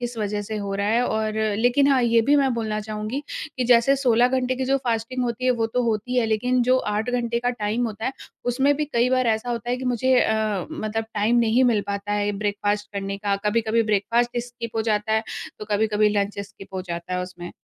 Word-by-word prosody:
किस 240 -1 -4
वजह 205 0 -2
से 215 +1 -5
हो 200 -1 -3
रहा 200 +1 -1
है 235 +3 +2
और 220 0 -1 0.2
लेक़िन 245 +4 +3
हाँ 260 - +3
ये 230 -1 +4
भी 290 - +6
मैं 270 -2 +3
बोलना 215 -2 -2
चाहूँगी 215 +5 -4 0.3
कि 255 - 0
जैसे 245 +3 +5
16 245 -2 +3
घंटे 255 0 0
की 260 - -1
जो 270 +1 +2
फास्टिंग 235 +2 -1
होती 240 +1 -3
है 255 - +4
वो 230 -2 +1
तो 250 +2 -1
होती 225 -3 +1 0.2
है 235 - +3
लेक़िन 245 +4 +1
जो 255 +2 +3
8 215 +3 -1
घंटे 235 -1 0
का 245 +1 +1
टाइम 230 +1 -1
होता 220 0 -6
है 265 - -1 0.3
उसमें 265 +4 +2
भी 300 - 0
कई 245 -4 +1
बार 255 -1 +2
ऐसा 225 +2 0
होता 235 0 -3
है 250 - +1
कि 260 - -6
मुझे 250 +1 +2
अ, 215 -4 0
मतलब 220 +1 -3
टाइम 215 +3 +2
नहीं 235 +2 +3
मिल 230 -4 +3
पाता 200 +1 -3
है 205 0 0
ब्रेकफास्ट 205 0 -1
का। 200 0 -2
कभी-कभी 225 +1 +2
ब्रेकफास्ट 230 +3 +1
स्किप 240 -1 -6
हो 220 - +1
जाता 215 -1 0
है, 220 - +2 0.4
तो - - -6
कभी-कभी 210 0 +2
लंच 200 0 -2
स्किप 200 -1 -11
हो 185 - -3
जाता 170 0 -6
है 180 - -1
उसमें। 180 -1 -8
225 Hz, 230 wpm, -23 LUFS, 210-245 Hz, 0.4 s, भी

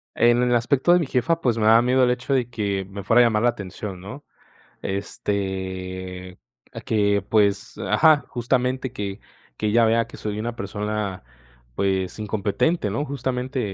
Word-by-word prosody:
En 120 +1 +4
el 125 - +2
aspecto 130 +7 +2
de 180 - +6
mi 165 - 0
jefa, 130 +6 +1
pues, 120 -7 +1
me 110 - +1
daba 115 +2 +7
miedo 130 +1 +3
el 125 - +4
hecho 125 +3 -2
de 125 -3 +1
que 100 -5 -2
me 100 +1 -7
fuera 115 +5 +5
a - - +6
llamar 110 -1 +1
la 120 - +5
atención, 100 -3 -6
¿no? 130 +10 -9 0.6
Este, 95 -2 -4 0.3
a - - -7
que, 100 -2 +1
pues 105 -2 +1
ajá, 155 -2 +4
justamente, 125 +1 -1
que 100 -3 -5 0.4
que 105 - -1
ella 115 +1 +4
vea 115 0 +2
que - - -12
soy 105 -1 -4
una 115 +2 -3
persona, 105 - -4 0.5
pues, 95 0 -1
incompetente, 105 - 0
¿no? 115 +9 -1
Justamente, 130 -1 -3
110 Hz, 170 wpm, -23 LUFS, 100-125 Hz, 0.6 s, daba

